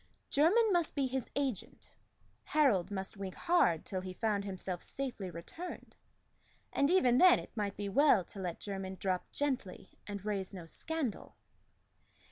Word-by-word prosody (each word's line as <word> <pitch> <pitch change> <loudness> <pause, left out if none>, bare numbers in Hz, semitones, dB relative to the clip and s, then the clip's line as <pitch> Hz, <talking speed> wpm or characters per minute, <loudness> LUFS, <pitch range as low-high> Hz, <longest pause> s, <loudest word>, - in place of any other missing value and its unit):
Jermyn 395 +9 +4
must 345 -3 +1
be 280 -2 +1
his 260 -1 -2
agent; 270 -8 -3 0.5
Harold 225 - +3
must 195 +1 -4
wink 195 -2 -5
hard 255 - +2
till 185 -1 -3
he 185 0 -6
found 210 -2 0
himself 185 -2 -4
safely 250 -9 -4
returned; 175 - -8 0.8
and 280 +1 +3
even 255 -9 +4
then 365 -1 +8
it - - -9
might 205 -3 -2
be 205 - -3
well 245 -2 +5
to 200 - -11
let 180 -3 -4
Jermyn 190 -2 -5
drop 185 -1 -2
gently 260 -10 -3 0.2
and 200 -1 -6
raise 195 -2 -2
no 175 -3 -7
scandal. 295 - -3
205 Hz, 150 wpm, -33 LUFS, 190-285 Hz, 0.8 s, then